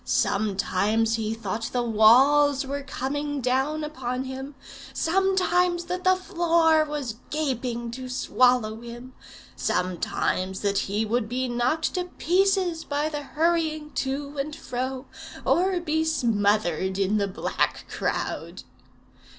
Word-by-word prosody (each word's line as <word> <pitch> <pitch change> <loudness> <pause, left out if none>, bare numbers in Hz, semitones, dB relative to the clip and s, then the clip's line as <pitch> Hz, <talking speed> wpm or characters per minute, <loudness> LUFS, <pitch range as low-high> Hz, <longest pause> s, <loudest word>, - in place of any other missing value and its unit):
Sometimes 210 +2 +1
he 220 0 -2
thought 225 0 -4
the 245 -1 +1
walls 265 +6 +5
were 280 +1 -3
coming 285 +1 -3
down 265 +5 0
upon 260 -4 -3
him; 265 +2 -7 0.4
sometimes 360 -1 +2
that 360 +1 -4
the 370 0 +5
floor 335 -4 +3
was 290 -7 -4
gaping 250 -5 -2
to 255 +1 -7
swallow 250 -3 +2
him; 240 +2 -9 0.4
sometimes 185 +1 -1
that 200 -1 +1
he 210 +3 0
would 220 0 -1
be 255 +2 -1
knocked 250 +7 0
to 360 -1 -1
pieces 360 -1 +1
by 295 +1 -1
the 295 -1 -4
hurrying 310 0 0
to 280 +2 -3
and 295 +2 -3
fro, 255 +2 -4 0.4
or 370 +1 +2
be 315 -2 0
smothered 205 - +1
in 200 +2 +1
the 200 -1 +1
black 195 +3 -2
crowd. - - -3
265 Hz, 125 wpm, -25 LUFS, 230-315 Hz, 0.4 s, walls